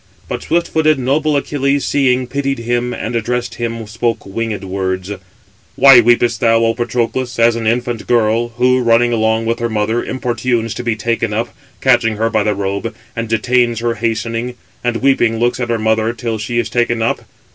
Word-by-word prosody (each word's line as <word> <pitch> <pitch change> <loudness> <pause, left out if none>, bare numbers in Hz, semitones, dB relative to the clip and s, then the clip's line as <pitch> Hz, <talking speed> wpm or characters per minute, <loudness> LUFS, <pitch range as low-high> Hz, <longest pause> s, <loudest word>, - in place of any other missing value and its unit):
But - - -4
swift 170 +1 0
footed 155 -1 +2
noble 145 +3 +1
Achilles, 140 0 0
seeing, 130 -2 +2
pitied 140 +1 -2
him, 120 +1 -1
and 120 0 -4
addressing 120 +2 -2
him, 115 -1 -3
spoke 115 +2 -2
winged 105 0 -4
words: 95 0 -3 0.6
"Why 135 -3 +8
weepest 120 -1 +2
thou, 115 -1 +4
O 115 - +2
Patroclus, 120 0 -2
as 115 0 +4
an 115 -1 -3
infant 120 0 -1
girl, 115 0 +2
who, 125 +1 +3
running 120 0 +3
along 110 0 +1
with 115 +1 -1
her 115 0 -1
mother, 110 +2 0
importunes 120 -3 -2
to - - -6
be 120 -2 0
taken 115 0 -1
up, 115 +3 -3 0.3
catching 120 -4 +3
her 115 +2 0
by 110 - +2
the 105 0 0
robe, 100 +3 -3 0.2
and 115 0 -3
detains 120 +1 +1
her 120 0 0
hastening; 115 +2 -2 0.3
and 120 0 -1
weeping, 120 -5 +2
looks 120 +2 +1
at 120 -1 -2
her 115 - +1
[mother] 110 +1 +1
till 115 -2 -4
she 120 +3 -3
is 120 - +1
taken 120 -1 +1
up? - - 0
115 Hz, 185 wpm, -16 LUFS, 115-125 Hz, 0.6 s, Why